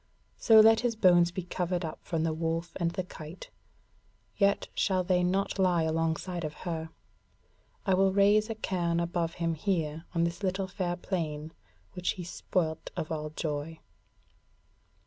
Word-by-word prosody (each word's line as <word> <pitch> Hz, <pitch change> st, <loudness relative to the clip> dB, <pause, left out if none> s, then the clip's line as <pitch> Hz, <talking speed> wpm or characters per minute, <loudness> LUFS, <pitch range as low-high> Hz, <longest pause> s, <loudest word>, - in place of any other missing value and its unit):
So 220 Hz, -1 st, +7 dB
let 225 Hz, +1 st, +6 dB
his 240 Hz, -2 st, 0 dB
bones 175 Hz, -4 st, +5 dB
be 180 Hz, +1 st, -5 dB
covered 180 Hz, 0 st, -2 dB
up 155 Hz, -, -6 dB
from 165 Hz, -2 st, -2 dB
the 165 Hz, -1 st, 0 dB
wolf 165 Hz, +1 st, -2 dB
and 170 Hz, -2 st, +1 dB
the 185 Hz, +2 st, -3 dB
kite. 165 Hz, -1 st, -10 dB, 0.8 s
Yet 200 Hz, -1 st, +2 dB
shall 185 Hz, -2 st, +1 dB
they 180 Hz, 0 st, +2 dB
not 195 Hz, +2 st, 0 dB
lie 180 Hz, -3 st, +3 dB
alongside 165 Hz, +2 st, -1 dB
of 155 Hz, 0 st, -4 dB
her. 160 Hz, -2 st, -3 dB, 1.0 s
I 190 Hz, -, +3 dB
will 190 Hz, +1 st, +4 dB
raise 205 Hz, +3 st, +4 dB
a 225 Hz, -, -2 dB
cairn 175 Hz, -5 st, -1 dB
above 170 Hz, -1 st, -1 dB
him 165 Hz, -1 st, -1 dB
here 160 Hz, -2 st, -2 dB
on 165 Hz, -, +3 dB
this 170 Hz, +1 st, -1 dB
fair 200 Hz, -, -3 dB
little 190 Hz, -1 st, -3 dB
plain 155 Hz, -4 st, -3 dB, 0.4 s
which 180 Hz, -1 st, -1 dB
he 180 Hz, -, -7 dB
spoilt 165 Hz, -2 st, -2 dB
of 160 Hz, -, -3 dB
all 155 Hz, -1 st, -3 dB
joy." 155 Hz, 0 st, -4 dB
175 Hz, 160 wpm, -29 LUFS, 165-190 Hz, 1.0 s, So